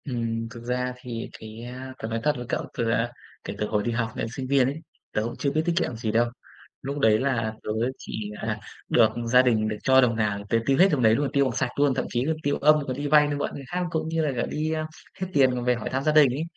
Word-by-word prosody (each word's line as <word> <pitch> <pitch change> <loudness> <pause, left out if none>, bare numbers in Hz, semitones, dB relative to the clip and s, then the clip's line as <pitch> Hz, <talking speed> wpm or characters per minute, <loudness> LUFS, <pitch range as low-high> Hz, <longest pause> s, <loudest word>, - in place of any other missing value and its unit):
Ừm, 115 -4 -2
thực 115 0 -10
ra 125 +1 -1
thì 115 -2 -5
cái, 110 +1 -9
a, 130 +2 -7
tớ 110 - -4
nói 115 0 -2
thật 150 - +3
với 125 - -5
cậu - - 0 0.2
từ, 115 -1 0
à, 115 +1 +1 0.3
kể - - -5
từ 105 - -1
hồi 105 -1 0
đi 120 - -1
học 115 -1 -1
đến - - -2
sinh 130 -1 -4
viên 135 -2 +4
ấy, 140 +4 -3 0.3
tớ 105 - +1
cũng 120 +2 -4
chưa 140 - 0
biết 155 - +1
tiết 175 - +1
kiệm 150 -9 0
gì 110 -1 -2
đâu. 115 +2 +3 0.5
Lúc 140 +2 -4
đấy 110 -4 +4
là 115 -5 0
tớ - - -6 0.3
chỉ 105 -1 -6
là 110 -1 -2 0.3
được 115 -2 +5 0.2
gia 125 +2 +6
đình 110 -4 +2
được 110 -1 -3
cho 130 0 +6
đồng 120 -2 +2
nào, 105 -2 -1
tớ 115 - +3
tiêu 135 +1 +3
hết 190 - +7
đồng 145 - +1
đấy 110 -1 +5
luôn, 140 +2 0
tiêu 140 -1 +4
bằng 125 -3 -2
sạch 130 - 0
luôn, 145 -2 +4
thậm - - -1
chí 120 +1 +1 0.2
tiêu 145 0 +1
âm, 150 +1 +6
còn 130 - -2
đi 145 +1 -2
vay, 150 0 +6
đi 145 - -1
mượn 145 - -2
người 140 - -7
khác, 180 +4 -2
cũng 160 -1 -1
như 160 -1 0
là 145 - +1
cả - - 0
đi 155 +1 -2 0.5
hết 185 - -1
tiền 135 -3 +5
còn 125 -1 -3
về 125 0 +3
hỏi 115 - -4
thăm 130 +1 -1
gia 155 - +3
đình 150 -3 +6
ấy. 145 +5 -2
125 Hz, 285 wpm, -25 LUFS, 115-140 Hz, 0.5 s, hết